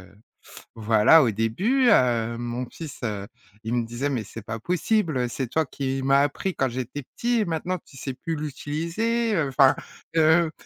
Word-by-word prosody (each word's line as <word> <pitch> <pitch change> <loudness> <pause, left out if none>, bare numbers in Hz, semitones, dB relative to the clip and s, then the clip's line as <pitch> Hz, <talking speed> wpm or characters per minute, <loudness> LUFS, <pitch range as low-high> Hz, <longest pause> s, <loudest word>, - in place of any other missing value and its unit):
heu. 95 +2 -17 0.6
Voilà, 110 +7 +5
au 115 - +2
début, 190 - +1
heu, 120 - +3
mon 120 +1 -4
fils, 160 -4 -9
heu, 100 -3 -3 0.4
il 110 +2 -3
me 120 -1 0
disait: 120 +5 -3
«Mais 120 -6 -2
c'est 115 - -9
pas 110 +1 -6
possible, 170 - 0
c'est 130 +1 -3
toi 160 +6 0
qui 135 -1 -3
m'a 135 +1 +4
appris 145 +6 -1
quand 135 - +1
j'étais 130 +3 -5
petit, 240 0 +1
et 215 - +1
maintenant 170 +2 -2
tu 140 - -18
sais 135 +1 -5
plus 165 +5 -4
l'utiliser» 170 - -2
heu, 160 -5 +1
enfin 135 0 +5 0.4
heu, 160 +1 +4
135 Hz, 180 wpm, -25 LUFS, 120-165 Hz, 0.6 s, Voilà